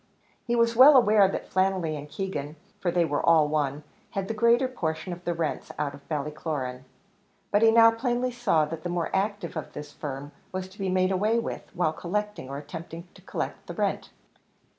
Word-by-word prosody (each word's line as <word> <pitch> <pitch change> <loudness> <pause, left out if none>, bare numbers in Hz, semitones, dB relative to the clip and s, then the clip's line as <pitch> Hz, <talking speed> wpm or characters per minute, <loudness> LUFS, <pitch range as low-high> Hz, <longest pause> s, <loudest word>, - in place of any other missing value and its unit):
He 240 - +1
was 230 0 +3
well 270 +4 +9
aware 210 -4 +6
that 195 - -4
Flannelly 185 -4 +1
and 150 0 -8
Keegan, 155 -5 -4 0.2
for 180 - 0
they 175 0 +2
were 145 -2 -1
all 160 -3 +5
one, 150 -1 -1 0.3
had 195 -2 -3
the 225 - -2
greater 235 +4 +3
portion 175 -7 -3
of 175 +1 -10
the 175 - 0
rents 165 -2 -3
out 145 -2 -2
of 140 +3 -15
Ballycloran, 145 -4 -3 0.7
and 205 - +4
he 225 - +7
now 230 0 +7
plainly 245 +2 -1
saw 215 -11 +2
that 160 +1 -6
the 175 - -4
more 175 -1 -2
active 205 0 -1
of 155 - -6
this 150 0 -8
firm 145 -1 -6 0.2
was 185 0 -4
to 190 - -18
be 195 -1 -1
made 185 0 +2
away 210 +5 +2
with, 230 - -4
while 170 -3 +1
collecting, 210 -2 -3
or 140 - -5
attempting 165 +4 -8
to - - -17
collect, - - -5
the - - -6
rent. - - -1
175 Hz, 200 wpm, -27 LUFS, 150-210 Hz, 0.7 s, well